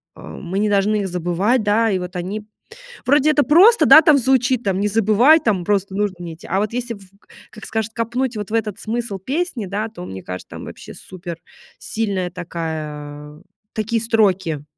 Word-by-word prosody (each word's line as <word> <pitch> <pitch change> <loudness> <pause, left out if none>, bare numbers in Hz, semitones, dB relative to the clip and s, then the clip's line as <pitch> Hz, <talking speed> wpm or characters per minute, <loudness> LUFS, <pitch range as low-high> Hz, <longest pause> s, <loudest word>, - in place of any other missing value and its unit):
а - - -14 0.2
мы 190 +2 -4
не 210 - +1
должны 205 +1 +2
их 195 - -2
забывать, 180 +7 0
да, 220 +2 +2
и 190 - +1
вот 180 +1 -7
они 195 +4 -4 0.6
Вроде 290 +3 +4
это 295 -1 +3
просто, 380 +10 +6
да, 315 - +9
там 295 -2 +5
звучит 255 -1 +2
там, 195 -2 -1
не 205 - +1
забывай, 225 +9 +4
там, 195 -6 0
просто 200 -1 0
нужно 205 -2 -1
мне 170 -2 -6
идти. 160 - -14
А 190 - 0
вот 210 +1 -2
если 240 -1 -3
в 200 - -14 0.2
к - - -30 0.2
как 215 - -12
скажет, 220 0 -3
копнуть 240 +1 -2
вот 210 -1 -5
в 225 - -4
этот 215 -3 -1
смысл 225 -3 -3
песни, 265 - -3
да, 205 +4 -3
то, 180 -5 -10
мне 95 - -8
кажется, 90 0 -8
там - - -8
вообще - - -10
суперсильная 185 +2 -6
такая, 155 -3 -6 0.3
такие 220 +1 -1
строки. 190 -9 +1
210 Hz, 190 wpm, -20 LUFS, 180-230 Hz, 0.6 s, да